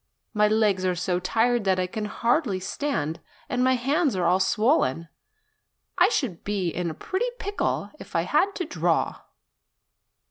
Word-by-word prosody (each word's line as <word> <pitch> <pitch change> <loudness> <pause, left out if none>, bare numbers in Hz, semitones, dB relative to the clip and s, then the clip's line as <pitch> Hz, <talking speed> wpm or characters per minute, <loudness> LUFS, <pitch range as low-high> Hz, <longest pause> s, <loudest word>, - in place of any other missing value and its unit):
My 210 -1 +4
legs 210 -3 +2
are 185 -1 +1
so 180 +1 -1
tired 230 +5 +1
that 190 -1 +3
I 185 - +1
can 210 +3 -4
hardly 230 - 0
stand, 180 - -2 0.3
and 250 0 0
my 260 0 +4
hands 275 - +1
are 180 -2 0
all 180 +2 +3
swollen. 190 - +1 0.9
I - - +5
should 240 - -2
be 200 -4 -1
in 175 +1 -2
a 160 - -6
pretty 415 - -2
pickle 405 -2 -2
if - - -12
I - - +2
had 400 +1 +1
to 360 - -2
draw 310 - 0
210 Hz, 165 wpm, -25 LUFS, 180-260 Hz, 0.9 s, I